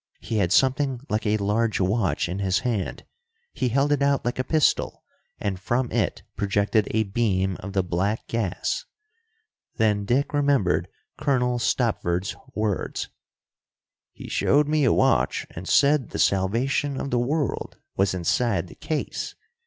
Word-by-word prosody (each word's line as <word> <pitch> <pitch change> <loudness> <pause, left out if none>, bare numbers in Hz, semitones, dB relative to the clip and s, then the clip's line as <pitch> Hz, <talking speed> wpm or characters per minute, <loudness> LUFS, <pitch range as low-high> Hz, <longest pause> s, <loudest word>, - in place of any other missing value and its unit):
He 110 - -3
had 95 -4 +1
something 130 +1 +2
like 110 +1 -1
a 105 +1 +2
large 110 +2 0
watch 95 0 +1
in 90 +3 -4
his 95 -1 +1
hand. 115 -7 -2 0.5
He 125 - 0
held 140 +4 +2
it 145 -1 +2
out 140 -2 +2
like 120 +1 -2
a - - +2
pistol, 155 +1 +1 0.4
and 95 -3 -2
from 120 +5 -1
it - - -1
projected 100 +1 +1
a 110 0 +1
beam 95 -3 0
of 95 +1 -7
the 95 -1 +2
black 95 +5 -1
gas. 105 -5 -2 0.9
Then 105 -2 +2
Dick 130 +8 +1
remembered 140 -11 +2 0.3
Colonel 125 -3 +1
Stopford's 95 -7 0 0.2
words: 105 -3 -2 1.0
"He - - -10
showed 145 +1 +2
me 150 -2 +2
a 125 - +4
watch - - +2
and 90 +3 -8
said 140 -2 +4
the - - -5
salvation 125 +9 +1
of 140 - -4
the 120 - +2
world 140 +2 -1 0.2
was 95 0 +1
inside 95 0 0
the - - -11
case. 155 -2 -4
110 Hz, 150 wpm, -25 LUFS, 95-130 Hz, 1.0 s, a